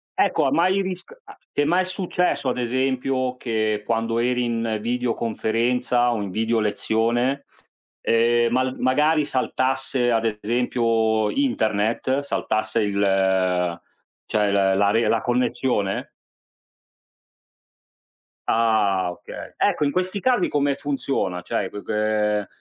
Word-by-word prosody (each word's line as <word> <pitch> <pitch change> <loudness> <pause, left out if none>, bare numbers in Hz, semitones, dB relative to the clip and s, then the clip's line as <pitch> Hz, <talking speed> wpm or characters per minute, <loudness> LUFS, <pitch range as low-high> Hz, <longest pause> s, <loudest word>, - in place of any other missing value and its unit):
Ecco 170 -6 +2
ha 135 - +1
mai 185 +6 +3
risc 185 - -5 0.4
ti - - +1
è 145 - +2
mai 180 +4 +2
successo, 180 -6 -1
ad 125 - -2
esempio, 130 +1 -1
che 110 -3 -1
quando 115 0 0
eri 125 +1 +1
in 115 -2 -1
videoconferenza 120 +1 0
o 115 -3 -1
in 100 - -4
video 115 +3 0
lezione, 115 +5 0 0.6
ehm, 120 +1 +2
mal 130 +1 0
magari 150 +4 +2
saltasse 130 -1 0
ad 115 -1 +1 0.2
esempio 115 -2 +1
internet, 115 - 0
saltasse 110 -5 -1
il, 100 -1 0
ehm, 95 -3 +1 0.5
cioè 105 -2 +1
la 95 -1 +3
la 100 +1 +3
re 115 0 +2
connessione? 120 -4 0 2.3
Ah 105 -5 +2
okay. 90 - -10
Ecco - - +1
in 145 - +1
questi 185 +4 -1
casi 250 +4 +2
come 145 -1 +1
funziona? 135 -11 -2
Cioè 95 +2 -2
qu 105 - -8
qu - - -5
ehm, 105 -1 0
115 Hz, 120 wpm, -23 LUFS, 110-130 Hz, 2.3 s, mai